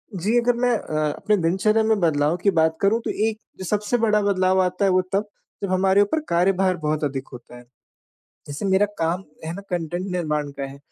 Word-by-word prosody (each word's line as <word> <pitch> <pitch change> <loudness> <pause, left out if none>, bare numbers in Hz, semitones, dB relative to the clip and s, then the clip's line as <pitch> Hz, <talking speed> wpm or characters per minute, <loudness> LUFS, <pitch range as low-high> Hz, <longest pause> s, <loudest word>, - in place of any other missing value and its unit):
जी, 205 +7 +1
अगर 245 +1 +2
मैं 245 0 +1
अ, 155 - -5 0.2
अपने 210 - +1
दिनचर्या 190 +6 +2
में 220 -1 +2
बदलाव 155 -2 +2
की 200 - +4
बात 160 0 +2
करूँ 205 +3 +3
तो - - -1 0.2
एक 215 -3 -10
सबसे 210 +3 0
बड़ा 215 -2 +2
बदलाव 190 -2 +2
आता 185 +2 0
है 195 - +3
वो 185 0 +4
तब 205 +2 0 0.4
जब 200 - -1
हमारे 190 +1 +3
ऊपर 205 +11 +1
कार्यभार 185 +1 +2
बहुत 155 -1 -2
अधिक 135 -2 -3
होता 120 0 -11
है। 120 - -13 0.8
जैसे 145 +5 -6
मेरा 190 +2 +3
काम 165 +3 0 0.2
है 160 - -4
ना 195 - -6
कंटेंट 175 +1 -3
निर्माण 150 -5 -2
का 140 - -2
है। 135 +1 -9
185 Hz, 205 wpm, -23 LUFS, 160-205 Hz, 0.8 s, की